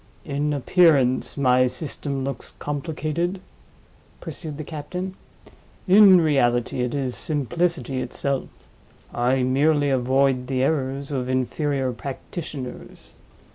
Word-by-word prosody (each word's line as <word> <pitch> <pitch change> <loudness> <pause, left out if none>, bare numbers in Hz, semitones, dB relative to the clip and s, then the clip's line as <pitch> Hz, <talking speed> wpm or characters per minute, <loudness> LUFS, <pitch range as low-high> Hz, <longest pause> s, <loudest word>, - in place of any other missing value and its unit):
"In 145 0 -1
appearance, 140 -4 +3
my 130 -2 +4
system 135 +1 -4
looks 135 +1 -5
complicated?" 155 +4 -3 0.8
pursued 155 -4 -7
the 155 - -5
captain. 175 +5 -5 0.7
"In 190 -1 +8
reality, 125 -6 +1
it 125 +2 -1
is 130 -3 -2
simplicity 155 -1 -1
itself. 140 0 -2 0.6
I 125 +2 +1
merely 145 +2 +2
avoid 130 0 +2
the 130 -1 0
errors 140 -1 -1
of 130 -2 -2
inferior 130 +1 0
practitioners. 140 0 -7
140 Hz, 100 wpm, -23 LUFS, 130-155 Hz, 0.8 s, In